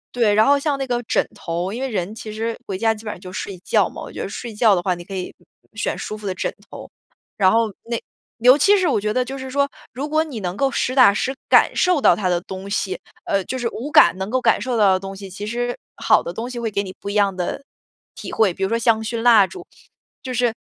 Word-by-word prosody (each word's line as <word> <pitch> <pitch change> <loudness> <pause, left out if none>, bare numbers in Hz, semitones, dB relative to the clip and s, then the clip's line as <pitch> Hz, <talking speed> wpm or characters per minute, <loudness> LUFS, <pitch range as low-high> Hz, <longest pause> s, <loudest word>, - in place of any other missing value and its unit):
对， 230 -4 +3
然 215 +1 +5
后 285 0 +4
像 285 -1 0
那 270 - -2
个 245 -2 -1
枕 - - +1
头。 175 +2 -4
因 235 +5 -5
为 270 - -1
人 195 -3 -3
其 220 -1 -8
实 225 +1 -3
回 195 - -3
家 225 +2 +2
基 220 +1 -12
本 210 - -3
上 - - -12
就 185 0 -10
睡 185 0 -5
觉 - - +2
嘛， - - -9
我 - - -8
觉 - - -6
得 - - -3
睡 235 -2 -7
觉 210 -1 +4
的 175 - 0
话， 185 +1 0
你 175 0 -8
可 195 +2 -8
以 185 -1 -5 0.4
选 220 - -2
舒 215 - -5
服 210 -1 -7
的 185 - -2
枕 - - -2 0.2
头。 - - -10 0.5
然 190 -2 +4
后 225 -1 +2
那 235 0 -3 0.4
尤 250 +4 +7
其 405 +8 +5
是 370 -2 +1
我 280 - +2
觉 210 +1 -1
得 255 - +1
就 270 +2 -6
是 265 0 -7
说， 280 +1 +1 0.2
如 275 +4 -4
果 310 +1 +2
你 275 -9 -7
能 180 0 -4
够 275 -1 +2
实 255 - -1
打 255 -6 +7
实 260 +5 -1 0.2
感 - - +5
受 360 -5 +2
到 - - +6
它 195 - -2
的 175 -1 +1
东 190 +2 -8
西， 200 -2 -2 0.3
呃， 195 -1 0
就 260 - -4
是 240 -2 -1
5 260 +6 -5
感 300 - +6
能 190 +1 -4
够 255 +2 0
感 225 -3 +3
受 245 +1 -1
到 205 -3 +5
的 185 - +2
东 195 0 -7
西， 195 0 -9
其 200 +3 -7
实 245 +2 -2 0.2
好 - - +3
的 170 - -6
东 230 +5 -5
西 250 -1 -5
会 230 -1 -2
给 200 -1 -1
你 185 -1 -8
不 200 - -6
一 - - -3
样 200 -2 +2
的 180 +9 -3 0.5
体 - - -7
会。 210 -5 +3
比 195 - -4
如 190 - +1
说 230 - +1
香 230 -1 +2
薰 225 +1 -3
蜡 225 -5 +6
烛， 370 - -10 0.6
就 255 - -5
是 245 -1 +1
220 Hz, 295 characters per minute, -21 LUFS, 195-250 Hz, 0.6 s, 尤